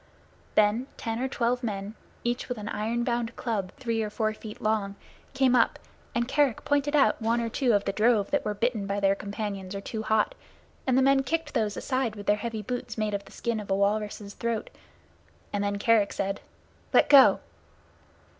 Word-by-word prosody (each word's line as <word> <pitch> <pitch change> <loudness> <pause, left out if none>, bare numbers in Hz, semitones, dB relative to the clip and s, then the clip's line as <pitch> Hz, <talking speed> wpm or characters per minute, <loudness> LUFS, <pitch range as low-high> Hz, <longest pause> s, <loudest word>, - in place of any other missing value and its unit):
Then 215 +5 +3
ten 225 -1 -3
or 260 - 0
twelve 245 -1 0
men, 205 -3 -4 0.3
each 240 +2 -2
with 250 - -2
an 210 -1 -5
iron 230 +3 -1
bound 235 -1 -1
club 205 -6 -2
three 230 -4 -1
or 215 - -2
four 215 +1 -1
feet 215 0 -9
long, 210 -2 0 0.4
came 265 -2 +4
up, 235 - +3 0.4
and 235 0 +1
Kerick 275 -2 +1
pointed 290 0 +1
out 275 -4 +3
one 230 +2 +1
or 230 -1 -1
two 245 0 +1
of 205 -1 +2
the - - +1
drove 215 -1 +2
that 290 - +1
were 210 - -2
bitten 220 -2 -1
by 200 0 -1
their 195 -1 +3
companions 200 -1 -5
or 195 - -4
too 220 +2 -4
hot, 220 - +1 0.5
and 260 -1 +3
the 265 - +5
men 275 0 +5
kicked 325 +2 -2
those 210 -2 0
aside 255 -5 -1
with 205 -1 -8
their 210 - +3
heavy 220 0 -4
boots 245 0 -4
made 215 -1 -1
of 200 0 -3
the - - -15
skin 235 -2 -2
of 205 - -8
a 195 - +2
walrus's 205 0 -1
throat, 235 0 -3 0.8
and 205 0 0
then 200 0 -1
Kerick 210 -1 +3
said, 195 0 -2 0.5
"Let - - +6
go!" 280 -2 +8
220 Hz, 200 wpm, -27 LUFS, 205-245 Hz, 0.8 s, go